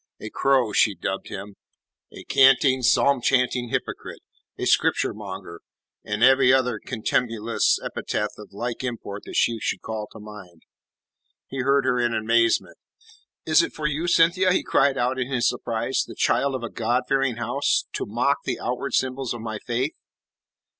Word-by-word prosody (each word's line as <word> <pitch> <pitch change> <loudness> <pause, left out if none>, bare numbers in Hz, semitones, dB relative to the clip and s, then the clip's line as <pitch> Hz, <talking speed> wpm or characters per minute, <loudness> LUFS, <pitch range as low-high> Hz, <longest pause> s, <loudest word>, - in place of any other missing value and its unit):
A 105 - -8
crow, 130 -6 +2
she 105 -1 +3
dubbed 95 +1 -4
him; 100 +1 -8 0.6
a - - -11
canting, 130 0 +4
psalm 130 +2 +3
chanting 125 -1 +1
hypocrite; - - -5 0.3
a - - -3
Scripture - - +2
monger, 95 -5 -9 0.4
and 105 +2 -2
every 130 0 +6
other 125 -4 +2
contumelious 115 -1 0
epithet 105 0 -3
of 105 - -12
like 120 +5 -5
import 110 -5 -6
that - - -8
she 115 -1 +2
should - - -3
call 110 -1 -5
to 110 - -12
mind. 105 -6 -12 0.9
He 135 - -6
heard 140 +1 +2
her 125 - +1
in 120 -1 0
amazement. 115 +1 +1 0.7
"Is - - +5
it 330 - -3
for 155 - -6
you, 150 +3 -1
Cynthia," 175 +2 +4
he - - +1
cried 135 0 +2
out 125 +2 0
in 130 +1 -3
his 120 -3 +1
surprise, 115 +3 -1
"the - - -11
child 140 -1 +1
of 125 - -5
a 120 - -5
God 120 +3 0
fearing 135 -3 +1
house, 120 +5 0
to - - -3
mock - - +1
the - - -3
outward - - -2
symbols 130 -2 -1
of 120 - -8
my 110 -1 -5
faith?" 125 +6 -2
120 Hz, 165 wpm, -24 LUFS, 110-135 Hz, 0.9 s, every